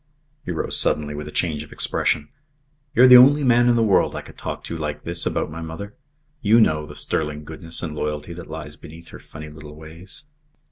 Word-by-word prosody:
He -, -, -9 dB
rose 80 Hz, -, -1 dB
suddenly, 75 Hz, -1 st, 0 dB
with 75 Hz, +1 st, -6 dB
a -, -, -7 dB
change 80 Hz, -4 st, 0 dB
of 75 Hz, -, -11 dB
expression. 75 Hz, -2 st, 0 dB, 0.7 s
"You're 125 Hz, -, +7 dB
the 125 Hz, 0 st, +10 dB
only 145 Hz, +3 st, +5 dB
man 120 Hz, -1 st, +4 dB
in 120 Hz, -, +4 dB
the 115 Hz, -, +3 dB
world 100 Hz, -4 st, +2 dB
I -, -, -5 dB
could -, -, -14 dB
talk -, -, -6 dB
to 85 Hz, -, -6 dB
like 75 Hz, -2 st, -4 dB
this 85 Hz, 0 st, -2 dB
about -, -, -2 dB
my 85 Hz, +2 st, -7 dB
mother. 85 Hz, +6 st, -7 dB, 0.5 s
You 110 Hz, +2 st, +5 dB
know 75 Hz, -8 st, +2 dB
the 75 Hz, -, -11 dB
sterling 75 Hz, 0 st, -2 dB
goodness 80 Hz, +2 st, -4 dB
and 80 Hz, -3 st, -4 dB
loyalty 75 Hz, +2 st, -4 dB
that 85 Hz, -1 st, -10 dB
lies 75 Hz, -1 st, -7 dB
beneath 80 Hz, +2 st, -13 dB
her -, -, -11 dB
funny 75 Hz, -1 st, -11 dB
little 75 Hz, 0 st, -12 dB
ways." 80 Hz, -, -11 dB
80 Hz, 215 wpm, -22 LUFS, 75-95 Hz, 0.7 s, the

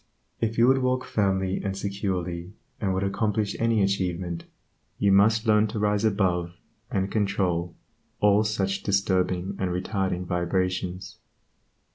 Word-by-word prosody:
If 115 Hz, 0 st, -1 dB
you 115 Hz, -, +6 dB
would 135 Hz, +1 st, +5 dB
walk 130 Hz, 0 st, 0 dB
firmly 95 Hz, -2 st, 0 dB
and 95 Hz, -1 st, -2 dB
securely, 95 Hz, -3 st, -3 dB, 0.3 s
and 100 Hz, -3 st, 0 dB
would 95 Hz, -, 0 dB
accomplish 105 Hz, +1 st, 0 dB
any 115 Hz, -2 st, +2 dB
achievement, 90 Hz, -3 st, -2 dB, 0.5 s
you 100 Hz, -, +3 dB
must 110 Hz, +4 st, +4 dB
learn 105 Hz, 0 st, +4 dB
to 110 Hz, +2 st, -5 dB
rise 105 Hz, 0 st, +1 dB
above 90 Hz, -5 st, +1 dB, 0.3 s
and 95 Hz, -6 st, -1 dB
control 90 Hz, -5 st, 0 dB, 0.4 s
all 105 Hz, +1 st, +4 dB
such 100 Hz, -2 st, -1 dB
disturbing 95 Hz, -1 st, 0 dB
and 95 Hz, -, 0 dB
retarding 90 Hz, 0 st, -2 dB
vibrations. 90 Hz, +1 st, -2 dB
95 Hz, 130 wpm, -26 LUFS, 90-105 Hz, 0.5 s, you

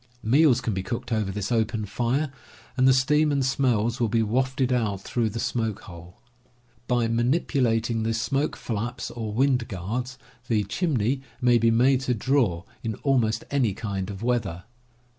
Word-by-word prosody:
Meals 130 Hz, +2 st, +4 dB
can 115 Hz, -4 st, -2 dB
be 95 Hz, -, -2 dB
cooked 120 Hz, +4 st, -5 dB
over 110 Hz, -3 st, 0 dB
this 100 Hz, +3 st, -4 dB
open 110 Hz, -2 st, 0 dB
fire, 125 Hz, +8 st, -1 dB, 0.4 s
and 130 Hz, 0 st, +3 dB
the -, -, +7 dB
steam 150 Hz, +4 st, +3 dB
and 140 Hz, -2 st, +1 dB
smells 125 Hz, -3 st, +1 dB
will 120 Hz, -, +2 dB
be 115 Hz, +1 st, +2 dB
wafted 130 Hz, +3 st, 0 dB
out 105 Hz, -6 st, 0 dB
through 120 Hz, +3 st, -1 dB
the -, -, -10 dB
TENTS -, -, -1 dB
AND -, -, -20 dB
TOOLS 115 Hz, -3 st, 0 dB
45 -, -, -17 dB
smoke -, -, -17 dB
hole. 85 Hz, +4 st, -12 dB, 0.7 s
By 120 Hz, -2 st, +2 dB
manipulating 120 Hz, -2 st, +1 dB
the 115 Hz, 0 st, 0 dB
smoke 135 Hz, +6 st, -1 dB
flaps 120 Hz, +2 st, -4 dB
or 110 Hz, -3 st, -5 dB
wind 125 Hz, +1 st, +1 dB
guards 120 Hz, +8 st, -4 dB, 0.3 s
the 110 Hz, -4 st, +1 dB
"chimney" 130 Hz, -, 0 dB, 0.2 s
may 120 Hz, -2 st, +4 dB
be 115 Hz, +1 st, +3 dB
made 125 Hz, +3 st, +3 dB
to 125 Hz, -2 st, 0 dB
draw, 115 Hz, -8 st, +1 dB, 0.2 s
in 110 Hz, -2 st, -2 dB
almost 120 Hz, -6 st, +1 dB
any 125 Hz, -9 st, +1 dB
kind 100 Hz, -3 st, -4 dB
of 100 Hz, +1 st, -7 dB
weather. 110 Hz, -8 st, -1 dB
120 Hz, 180 wpm, -25 LUFS, 110-130 Hz, 0.7 s, the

